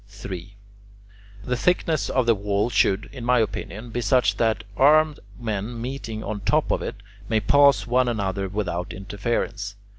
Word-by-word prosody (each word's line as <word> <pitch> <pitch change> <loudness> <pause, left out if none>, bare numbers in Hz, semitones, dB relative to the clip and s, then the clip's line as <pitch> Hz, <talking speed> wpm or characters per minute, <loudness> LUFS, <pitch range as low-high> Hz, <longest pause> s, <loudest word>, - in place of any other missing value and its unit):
3. 100 -1 -8 0.9
The 125 - -1
thickness 165 +2 +1
of 130 -2 +1
the 115 - +5
wall 100 +2 -1
should, 95 -4 +2
in 130 -3 -7
my 125 +1 +3
opinion, 110 +1 -3
be 120 - -2
such 105 -2 +2
that 110 -3 +1
armed 150 +4 +4 0.2
men 110 0 -3
meeting 115 -3 -5
on 105 -1 -4
top 100 - +1
of - - 0
it - - -4 0.3
may 110 -2 +3
pass 140 +6 +4
one 125 +1 +2
another 100 -4 -1
without 90 -3 -3
interference. 100 +1 -3
110 Hz, 155 wpm, -24 LUFS, 100-125 Hz, 0.9 s, the